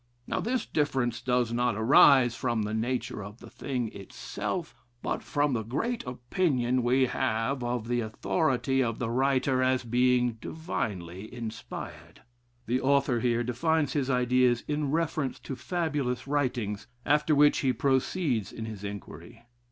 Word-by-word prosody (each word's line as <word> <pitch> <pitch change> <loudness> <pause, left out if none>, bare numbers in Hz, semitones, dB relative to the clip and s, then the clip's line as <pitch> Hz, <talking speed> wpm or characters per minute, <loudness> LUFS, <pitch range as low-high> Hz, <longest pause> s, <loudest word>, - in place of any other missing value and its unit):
Now, - - -2
this 250 +3 -1
difference 135 -5 0
does 125 -2 +1
not 120 -1 +1
arise 120 +2 +6
from 120 -3 -1
the 105 +1 -3
nature 115 -2 -2
of 100 +2 -9
the - - -13
thing 125 -5 -3
itself, 160 - -5 0.3
but - - -2
from 145 -1 0
the 115 - 0
great 225 - -2
opinion 125 0 0
we 130 +2 +3
have 130 +1 -1
of 120 -2 -2
the 120 0 0
authority 135 +3 0
of 115 -3 -1
the 115 -2 -2
writer 130 +1 +2
'as 130 0 +2
being 125 -1 +2
divinely 105 - -4
inspired.' 115 -2 -8 0.4
The 125 +2 0
author 140 -2 +2
here 120 0 +1
defines 145 +4 0
his 140 -3 0
ideas 125 -1 +3
in 150 -1 -1
reference 155 -3 -1
to 135 - -5
fabulous 145 -7 -2
writings, 125 -8 -1 0.2
after 150 +1 +3
which 145 +1 +5
he 135 - +2
proceeds 130 - 0
in 110 - -6
his 110 -3 -7
inquiry. 100 +2 -8
125 Hz, 145 wpm, -28 LUFS, 115-140 Hz, 0.4 s, arise